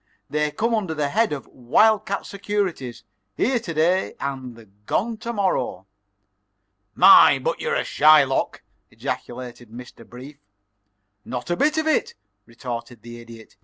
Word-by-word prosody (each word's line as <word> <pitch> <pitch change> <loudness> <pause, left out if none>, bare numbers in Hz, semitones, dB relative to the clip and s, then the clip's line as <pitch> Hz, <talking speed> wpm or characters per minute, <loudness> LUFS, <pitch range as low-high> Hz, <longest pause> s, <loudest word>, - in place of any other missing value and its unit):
They 150 0 0
come 225 +11 -1
under 190 -8 -1
the 150 -2 -1
head 225 +7 +1
of 145 -3 -5
wild 200 - +2
cat 200 - -3
securities 195 - -4 0.3
here 250 +1 +1
to 205 -7 -7
day 170 +4 +1
and 120 -7 -8
gone 225 +3 -1
to 235 +2 -5
morrow." 185 - -1 1.1
"My, - - +8
but - - -3
you're - - -1
a - - 0
Shylock!" 150 -3 +3 0.3
ejaculated 120 -1 -7
Mr. 120 0 -12
Brief. 130 +5 -12 0.8
"Not 125 +6 -6
a - - +2
bit 300 - +1
of 315 - 0
it," 315 - 0 0.3
retorted 115 -1 -8
the 120 0 -10
Idiot. 115 -1 -14
145 Hz, 140 wpm, -22 LUFS, 120-200 Hz, 1.1 s, My